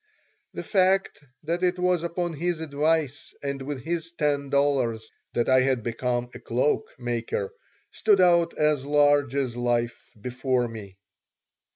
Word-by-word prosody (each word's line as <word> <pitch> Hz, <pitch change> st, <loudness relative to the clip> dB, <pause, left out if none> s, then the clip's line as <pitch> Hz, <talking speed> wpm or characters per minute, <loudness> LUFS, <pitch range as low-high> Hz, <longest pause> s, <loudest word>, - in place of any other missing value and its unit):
The -, -, -4 dB
fact 190 Hz, -1 st, +2 dB, 0.2 s
that 170 Hz, +3 st, -2 dB
it 180 Hz, 0 st, +1 dB
was 180 Hz, -1 st, +1 dB
upon 170 Hz, 0 st, -2 dB
his 170 Hz, +2 st, -2 dB
advice 155 Hz, -1 st, -1 dB
and 140 Hz, -1 st, -3 dB
with 135 Hz, -1 st, -5 dB
his 165 Hz, 0 st, -3 dB
ten 145 Hz, -3 st, 0 dB
dollars 135 Hz, -6 st, +1 dB, 0.2 s
that 120 Hz, -, +1 dB
I 130 Hz, 0 st, +5 dB
had 130 Hz, -3 st, +1 dB
become 120 Hz, +1 st, -2 dB
a -, -, -9 dB
cloak 150 Hz, -, 0 dB
maker 120 Hz, -, -3 dB, 0.4 s
stood 210 Hz, -3 st, +3 dB
out 170 Hz, -2 st, +4 dB
as 150 Hz, -3 st, +2 dB
large 145 Hz, -1 st, +3 dB
as 130 Hz, -4 st, -1 dB
life 120 Hz, -1 st, -1 dB
before 125 Hz, +1 st, -1 dB
me. 105 Hz, -4 st, -10 dB
140 Hz, 145 wpm, -26 LUFS, 125-170 Hz, 0.4 s, I